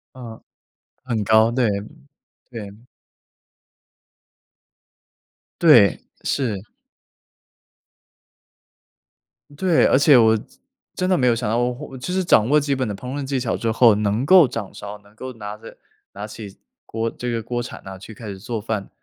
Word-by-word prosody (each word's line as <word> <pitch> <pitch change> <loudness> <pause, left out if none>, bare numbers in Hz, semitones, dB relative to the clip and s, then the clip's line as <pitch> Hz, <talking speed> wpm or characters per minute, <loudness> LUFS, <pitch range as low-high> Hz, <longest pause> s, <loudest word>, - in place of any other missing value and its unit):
呃， 120 -3 -10 0.6
很 115 -4 -2
高， 110 +2 +4
对， 120 -1 +1 0.8
对。 110 -5 -7 2.9
对， - - +6 0.2
是。 115 -8 -2 2.9
对， 175 +1 +2
而 - - +4
且 145 -1 +6
我 110 -2 +5
真 110 - -6 0.5
真 185 0 -1
的 185 - +3
没 125 - +2
有 120 - +3
想 115 -2 -3
到 115 - 0
我 120 +1 +1 0.2
我 130 - -9
就 130 +8 -5
是 190 0 0
掌 115 -9 +3
握 150 +1 +5
基 140 -1 -1
本 130 -2 -2
的 105 - -3
烹 125 +6 -7
饪 145 - -3
技 135 -1 -2
巧 120 -2 -2
之 115 - -1
后， 115 -1 +5
能 105 +4 -1
够 175 -1 +7
掌 110 -5 -6
勺， 105 0 -8
能 100 +1 -24
够 130 +3 -8
拿 105 -2 -7
着 105 - -13 0.4
拿 100 +2 -7
起 105 -2 -10 0.3
锅 115 +1 -3
这 125 - -6
个 115 -1 -2
锅 120 +2 -3
铲 120 - -9
哪， 95 0 -8
去 100 +4 -12
开 110 +1 -10
始 100 -2 -6
做 115 +3 -4
饭。 105 -2 -4
115 Hz, 170 characters per minute, -21 LUFS, 105-130 Hz, 2.9 s, 够